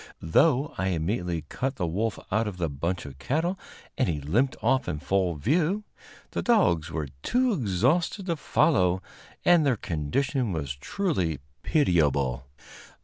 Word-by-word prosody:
Though 135 - +3
I 95 - +1
immediately 90 -1 -1
cut 135 - -2
the 90 - -1
wolf 105 +7 -1
out 110 +2 +1
of 100 -3 -5
the 85 -4 -1
bunch 85 +6 -2
of 70 -1 -10
cattle 165 - -1 0.4
and - - +2
he 75 -3 -1
limped 105 - +1
off 135 0 +2
in 75 - -2
full 90 +2 0
view, 165 - +1 0.5
the - - -2
dogs 90 - +3
were 80 -3 -3
too 250 - +2
exhausted 150 - +1
to 170 -3 0
follow, 95 - +2 0.4
and 175 -2 +6
their 135 -5 +2
condition 105 - -1
was 70 -4 -3
truly 95 - -1 0.2
pitiable. 70 - +1
95 Hz, 145 wpm, -27 LUFS, -, 0.5 s, and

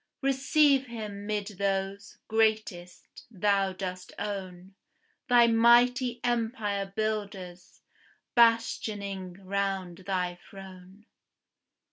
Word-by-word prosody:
Receive 275 0 +3
him 210 -3 -7
'mid 210 -1 -1
those, 195 0 -2
greatest, 215 -5 -1
thou 200 -2 +1
dost 185 -1 -6
own, 190 -2 -6 0.6
Thy 240 -1 +7
mighty 240 +2 +4
empire 225 -4 -1
builders, 200 -5 -4 0.5
bastioning 205 -5 +1
round 195 -2 -2
thy 180 -2 -2
throne. 190 +1 -13
200 Hz, 80 wpm, -28 LUFS, 190-230 Hz, 0.6 s, Thy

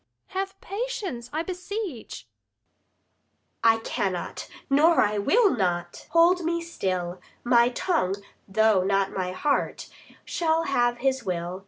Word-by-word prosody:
Luc. - - -20
Have 390 0 -4
patience, 395 - -4
I 310 +2 -1
beseech. 365 - -6 1.4
Adr. 225 - +7
I - - -3
cannot, 185 -5 -3 0.2
nor 310 +5 +4
I 210 0 +2
will 405 - +4
not, 175 -4 -2
hold 340 +2 +4
me 335 +1 0
still; 185 - -3 0.2
My 240 0 +5
tongue, 245 - 0 0.3
though 215 -1 +3
not 195 0 +1
my 185 -1 -2
heart, 280 +10 -1 0.4
shall 325 -1 +1
have 240 -5 +1
his 265 -2 +1
will. 180 -1 -3
245 Hz, 130 wpm, -26 LUFS, -, 1.4 s, Adr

